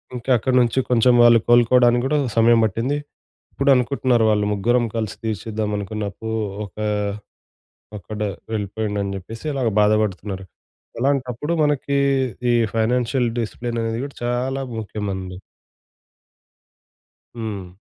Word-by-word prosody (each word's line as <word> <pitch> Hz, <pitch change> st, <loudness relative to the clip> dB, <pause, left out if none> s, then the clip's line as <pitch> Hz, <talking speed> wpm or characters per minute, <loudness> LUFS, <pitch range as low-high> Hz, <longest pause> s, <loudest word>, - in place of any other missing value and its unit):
ఇంకా 125 Hz, +1 st, -7 dB
అక్కడ్నుంచి 125 Hz, +1 st, +2 dB
కొంచెం 125 Hz, 0 st, +4 dB
వాళ్ళు 120 Hz, -1 st, +7 dB
కోలుకోవడానికి 120 Hz, 0 st, +5 dB
గూడా 150 Hz, +3 st, +1 dB, 0.2 s
సమయం 115 Hz, +1 st, +5 dB
బట్టింది. 115 Hz, +7 st, -1 dB, 0.6 s
ఇప్పుడు 140 Hz, 0 st, +2 dB
అనుకుంటున్నారు 125 Hz, -2 st, +2 dB
వాళ్ళు 105 Hz, -1 st, +1 dB
ముగ్గురం 120 Hz, +4 st, +2 dB
కలిసి 110 Hz, -3 st, -2 dB
తీర్చెద్దాం 110 Hz, 0 st, -3 dB, 0.4 s
అప్పు 110 Hz, +2 st, -8 dB, 0.4 s
ఒకా 105 Hz, +2 st, -6 dB, 1.1 s
అక్కడ 105 Hz, +2 st, -8 dB, 0.3 s
వెళ్ళిపోయిండు 105 Hz, 0 st, -3 dB
అని 100 Hz, 0 st, -3 dB
చెప్పేసి 115 Hz, -, -9 dB
అలాగా 130 Hz, -4 st, 0 dB
బాధపడుతున్నారు. 105 Hz, -2 st, 0 dB, 0.6 s
అలాంటప్పుడు 135 Hz, +2 st, -1 dB
మనకి 140 Hz, -1 st, 0 dB, 0.6 s
ఈ -, -, +3 dB, 0.2 s
ఫైనాన్షియల్ 120 Hz, +2 st, +1 dB
డిసిప్లిన్ 120 Hz, +1 st, -3 dB
అనేది 115 Hz, +1 st, -2 dB
కూడా 140 Hz, -, -13 dB
చాలా 125 Hz, +3 st, -1 dB, 0.2 s
ముఖ్యం 105 Hz, -1 st, -5 dB
అండి. 95 Hz, -1 st, -6 dB, 2.0 s
హ్మ్. 100 Hz, -6 st, -6 dB
115 Hz, 110 wpm, -21 LUFS, 105-125 Hz, 2.0 s, వాళ్ళు